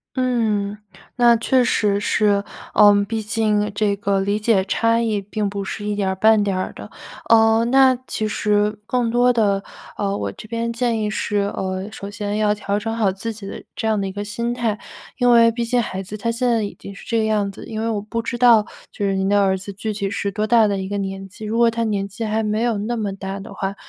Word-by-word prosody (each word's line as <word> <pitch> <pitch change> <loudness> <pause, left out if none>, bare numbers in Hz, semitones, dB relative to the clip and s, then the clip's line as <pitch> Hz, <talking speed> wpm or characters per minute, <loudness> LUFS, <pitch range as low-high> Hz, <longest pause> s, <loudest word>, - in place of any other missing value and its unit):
嗯， 220 -6 0 0.4
那 240 -1 +5
确 255 +3 +2
实 205 -4 +1
是， 205 -1 +2 0.3
呃， 205 -1 +7 0.2
毕 225 -1 -2
竟 210 -1 0
这 205 -1 +1
个 200 -1 0
理 200 +2 0
解 215 -3 +2
差 230 +3 +2
异 220 -3 0
并 205 +1 -3
不 200 0 -4
是 205 - -5
一 210 - -1
点 200 -2 0
儿 190 - -1
半 215 +2 +4
点 200 -2 -1
儿 185 - -2
的。 - - -10 0.4
呃， 225 0 +5
那 265 -1 +6
其 215 - -2
实 210 0 +1
更 245 0 0
多 245 +1 +3
的， 200 -4 +1 0.3
呃， 200 -1 -1
我 - - -3
这 - - -12
边 230 +1 -2
建 235 -1 0
议 210 - -1
是， 210 0 -2 0.2
呃， 190 +1 -3
首 200 -1 -8
先 205 0 -3
要 210 -1 +2
调 205 -1 -2
整 225 +2 -3
好 215 -4 +2
自 210 +4 -5
己 205 -2 -9
的 - - -8
这 220 - -2
样 215 -1 +1
的 195 - -1
一 - - -4
个 205 +2 -5
心 235 +3 -3
态。 230 -3 -1 0.4
因 245 -1 +3
为 230 -1 +6
毕 235 +1 -2
竟 245 +1 +1
孩 190 -4 -4
子 195 +3 -8
他 230 +2 -2
现 245 +2 -1
在 230 -2 +2
已 205 - -4
经 200 - -10
是 195 - -12
这 230 - 0
个 220 - +2
样 210 -2 0
子， 195 - -11
因 220 -1 -5
为 225 - -1
我 215 -2 -1
不 215 +3 -4
知 240 +1 -4
道 235 -3 +5 0.2
就 - - -5
是 195 -1 +1
您 190 0 0
的 205 0 +3
儿 190 -1 +2
子 200 +2 -8
具 215 +2 -4
体 200 -1 -3
是 200 0 -2
多 210 +2 -1
大 225 -1 +4
的 200 -1 -1
一 190 0 -4
个 205 +1 -3
年 195 0 -5
纪， 200 +3 -12
如 220 +2 -2
果 235 -1 +4
他 230 0 -2
年 200 -2 -1
纪 205 +4 -7
还 220 0 0
没 215 +1 -1
有 235 -2 +1
那 215 +4 -2
么 210 -3 -2
大 195 0 -5
的 195 - -10
话， 195 0 -3
210 Hz, 265 characters per minute, -21 LUFS, 200-230 Hz, 0.4 s, 呃